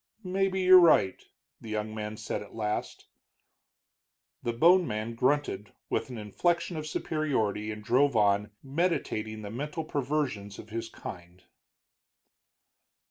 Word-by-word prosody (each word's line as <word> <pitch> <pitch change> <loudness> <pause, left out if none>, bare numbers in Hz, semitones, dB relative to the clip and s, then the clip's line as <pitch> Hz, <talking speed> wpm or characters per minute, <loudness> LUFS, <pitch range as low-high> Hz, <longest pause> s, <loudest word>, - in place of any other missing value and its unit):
"Maybe 190 0 0
you're 185 0 +9
right," 155 - +4 0.4
the 115 - -10
young 110 0 -3
man 105 0 -5
said 105 - -4
at 105 - -12
last. 105 -1 -3 1.4
The 120 - -1
bone 170 +8 +5
man 110 +2 -3
grunted, 125 -5 0 0.2
with - - -1
an 125 - -6
inflection 170 - 0
of 155 -1 -4
superiority, 130 -10 -1
and 105 0 -6
drove 130 +5 +3
on, 105 -1 +3
meditating 135 -8 -1
the 100 - -6
mental 150 +7 -4
perversions 135 -9 -2
of 110 - -11
his 115 +1 -4
kind. 90 -3 -10
115 Hz, 130 wpm, -29 LUFS, 105-155 Hz, 1.4 s, you're